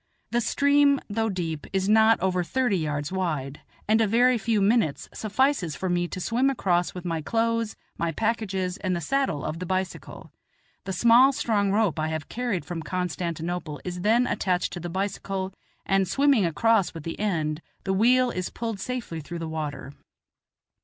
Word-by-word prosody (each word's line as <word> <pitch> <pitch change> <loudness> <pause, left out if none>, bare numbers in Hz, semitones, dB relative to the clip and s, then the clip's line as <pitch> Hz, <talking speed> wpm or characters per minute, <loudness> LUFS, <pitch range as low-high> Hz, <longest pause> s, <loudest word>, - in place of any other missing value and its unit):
The 240 - +2
stream, 280 +3 +3
though 225 +1 0
deep, 165 -6 -4
is 190 0 0
not 220 +1 +5
over 185 -1 +1
thirty 245 0 0
yards 150 -1 -2
wide, 155 -7 -2 0.3
and 220 +2 +4
a 220 - +3
very 240 +3 +4
few 220 +1 +1
minutes 205 - +2
suffices 215 - 0
for 190 - -3
me 175 0 +1
to 185 - -6
swim 240 +8 +1
across 180 -10 0
with 180 0 -7
my 165 -2 -1
clothes, 230 +4 0 0.2
my 170 -1 0
packages, 195 -2 -1
and 185 -3 -1
the - - -1
saddle 220 - -1
of 160 - -3
the 180 - -4
bicycle; 185 0 -4 0.5
the 195 - -3
small, 235 +7 +6
strong 210 -6 0
rope 200 -7 +1
I 155 - 0
have 160 -2 -4
carried 235 -7 -2
from 175 -2 -5
Constantinople 170 -2 -3
is 180 0 -4
then 230 +5 +3
attached 180 -6 0
to 175 - -5
the 175 +1 -5
bicycle, 190 0 -3 0.3
and, 195 -1 +2
swimming 275 -8 +3
across 215 +3 +2
with 165 - -7
the 165 - -6
end, 160 -7 -1 0.2
the 190 - 0
wheel 245 +5 +4
is 185 -3 -3
pulled 225 -4 -4
safely 235 -7 -4
through 170 +4 -7
the 165 -1 -4
water. 150 -3 -5
190 Hz, 175 wpm, -26 LUFS, 170-230 Hz, 0.5 s, small